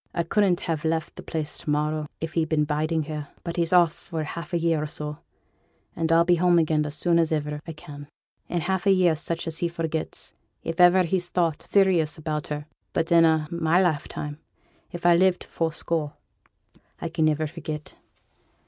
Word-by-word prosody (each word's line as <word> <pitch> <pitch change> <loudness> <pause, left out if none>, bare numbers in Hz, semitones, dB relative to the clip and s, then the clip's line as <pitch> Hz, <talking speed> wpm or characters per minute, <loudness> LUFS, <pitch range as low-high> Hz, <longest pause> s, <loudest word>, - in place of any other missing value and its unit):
I 170 - +1
couldn't 185 +1 +2
ha' 165 -1 -2
left 160 0 -1
the - - -8
place 155 -2 -3
to - - -6
morrow 150 +1 0
if 160 0 -4
he'd 160 -2 0
been 155 -2 +2
biding 155 +2 0
here; 150 -1 -5 0.2
but 170 0 -5
he's 170 -1 +1
off 175 -3 +5
for 165 -3 -5
half 170 +3 -6
a 175 - +1
year 165 -2 +1
or 155 - -2
so, 150 0 -6 0.8
and 165 0 -1
I'll 165 +1 +5
be 175 0 +4
home 175 0 +4
again 155 -2 +2
as 150 - -4
soon 170 +1 +2
as 165 -1 +2
iver 150 -1 -2
I 165 - -5
can. 145 -1 -11 0.4
In 175 - -1
half 190 +3 -1
a - - +7
year 185 -3 +4
such 165 +2 -3
as 165 -1 -4
he 175 - +1
forgets, 165 -2 -4 0.3
if 165 +2 -1
iver 180 +1 +7
he's 175 0 0
thought 170 -4 0
serious 180 -6 +2
about 155 -1 -3
her; 150 0 -4 0.3
but 165 0 -1
in 165 -1 +7
a' 160 -1 +2
my 170 0 +2
lifetime, 150 -3 -1 0.5
if 175 0 -7
I 175 -1 +7
live 185 +1 +4
to - - -13
fourscore, 160 -2 -2 0.9
I - - -3
can 165 -1 0
niver 155 0 +2
forget. 155 -1 -6
165 Hz, 200 wpm, -25 LUFS, 155-170 Hz, 0.9 s, a